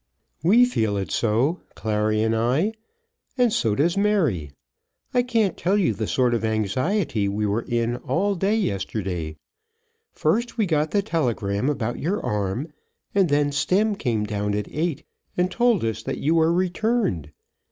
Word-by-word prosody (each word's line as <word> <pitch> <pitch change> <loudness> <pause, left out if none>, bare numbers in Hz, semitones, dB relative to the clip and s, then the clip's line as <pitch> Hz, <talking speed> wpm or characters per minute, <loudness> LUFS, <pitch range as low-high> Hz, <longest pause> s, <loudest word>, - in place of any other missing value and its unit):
"We 215 +10 +6
feel 110 - 0
it 95 - -3
so, 120 +10 +1
Clary 110 0 0
and 110 0 +1
I, 130 - +1 0.6
and 245 -3 +3
so 110 -3 +1
does 170 +7 +2
Mary. 175 - +1 0.6
I 250 - +4
can't 230 -5 +1
tell 190 +4 +1
you 175 - +2
the 105 +1 -3
sort 125 -2 +2
of 115 -2 -1
anxiety 110 - 0
we 105 +2 -1
were 105 +3 0
in 120 0 -1
all 200 +9 0
day 195 +3 +1
yesterday. 95 - -2 0.7
First 220 +11 0
we 220 - +2
got 155 -3 +1
the 200 +3 +1
telegram 120 - 0
about 120 -5 -2
your 185 +8 -1
arm, 105 - -2 0.4
and 195 -4 +3
then 145 0 +2
Stemm 195 +9 +1
came 120 - -1
down 105 -1 -2
at 105 -1 -2
eight 160 -1 -2 0.3
and 180 +1 +1
told 235 - +2
us 110 0 -2
that 135 +4 -4
you 155 +4 +1
were 165 0 +4
returned. 180 - 0
145 Hz, 160 wpm, -24 LUFS, -, 0.7 s, We